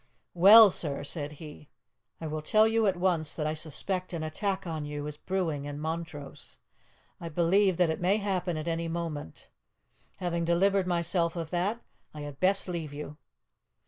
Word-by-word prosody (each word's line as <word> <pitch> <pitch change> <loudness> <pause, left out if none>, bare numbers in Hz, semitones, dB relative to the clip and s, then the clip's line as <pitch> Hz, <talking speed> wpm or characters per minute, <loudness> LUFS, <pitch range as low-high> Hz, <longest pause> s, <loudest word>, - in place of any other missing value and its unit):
"Well, 205 +4 +9
sir," 145 -6 -3
said 145 0 -4
he, 150 -1 -12 0.5
"I 165 - -6
will 155 0 -3
tell 215 +8 +4
you 225 -1 +2
at 190 -2 +1
once 175 -4 0
that 155 - -2
I 155 - 0
suspect 180 +4 -4
an 165 -2 -3
attack 190 +5 -2
on 160 -3 -4
you 145 0 -5
is 150 0 -5
brewing 160 -4 -2
in 145 0 -5
Montrose. 160 -2 -6 0.6
I 170 - -6
believe 180 +3 +2
that 175 -3 +3
it 160 - -4
may 190 +4 +3
happen 185 -5 -2
at 155 +1 -5
any 165 0 -1
moment. 165 - -5 0.7
Having 170 -2 -2
delivered 190 +3 +2
myself 170 -1 0
of 165 -2 -5
that, 195 +6 -1 0.3
I 150 - -7
had 145 -1 -8
best 195 +2 +2
leave 165 -5 -4
you." 150 0 -7
170 Hz, 175 wpm, -29 LUFS, 155-185 Hz, 0.7 s, Well